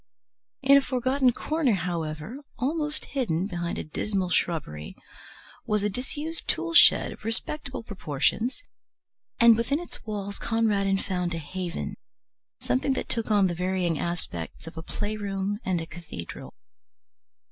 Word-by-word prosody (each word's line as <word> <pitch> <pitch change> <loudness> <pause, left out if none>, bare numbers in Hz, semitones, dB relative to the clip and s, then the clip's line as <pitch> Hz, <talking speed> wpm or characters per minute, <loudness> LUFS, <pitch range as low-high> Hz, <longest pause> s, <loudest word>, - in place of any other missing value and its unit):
In 275 +1 +8
a - - +5
forgotten 260 0 +2
corner, 305 -1 +1
however, 170 - -3 0.2
almost 300 +4 0
hidden 190 - 0
behind 175 -3 -3
a - - -2
dismal 185 +3 -2
shrubbery, 80 - -1 0.7
was 210 -1 +2
a 210 - +1
disused 295 +8 -4
tool 335 +1 0
shed - - +7
of - - -11
respectable 260 +4 -2
proportions, 210 - -1 0.8
and 235 -2 +8
within 235 +6 +1
its 350 - -8
walls 200 -2 -4
Conradin 205 -4 +2
found 180 -3 -1
a - - -2
haven, 180 +5 -4 0.6
something 265 +1 +1
that - - -3
took 230 -2 0
on 205 -2 +5
the 180 - +1
varying 180 -2 0
aspects 165 - -4
of 165 - -9
a 160 - -5
playroom 205 +1 -2
and 185 -2 +1
a 165 - -4
cathedral. 145 - -8
200 Hz, 135 wpm, -27 LUFS, 175-250 Hz, 0.8 s, In